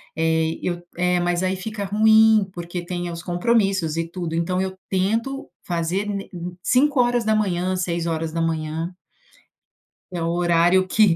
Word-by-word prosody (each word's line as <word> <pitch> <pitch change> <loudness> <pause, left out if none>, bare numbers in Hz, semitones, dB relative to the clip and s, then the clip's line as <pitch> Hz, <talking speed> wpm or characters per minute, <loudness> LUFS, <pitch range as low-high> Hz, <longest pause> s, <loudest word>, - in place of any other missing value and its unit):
eh, 160 0 +1
eu 175 -1 -2 0.2
eh, 180 0 +2
mas 175 0 0
aí 185 +1 +1
fica 205 +2 -5
ruim 220 0 +5
porque 175 0 -5
tem 175 0 -3
os 170 0 -7
compromissos 190 -3 +1
e 165 0 -1
tudo. 170 -1 -4
Então 180 +2 0
eu 190 0 -3
tento 225 +8 -1 0.2
fazer 175 +3 -1
n 200 -1 -4
em 175 0 -6
5h, 220 -9 +2
6h 165 -1 -2 1.2
que 180 - -5
é - - -3
o 165 - 0
horário 175 +2 +3
que 205 -4 +4
180 Hz, 140 wpm, -22 LUFS, 170-200 Hz, 1.2 s, ruim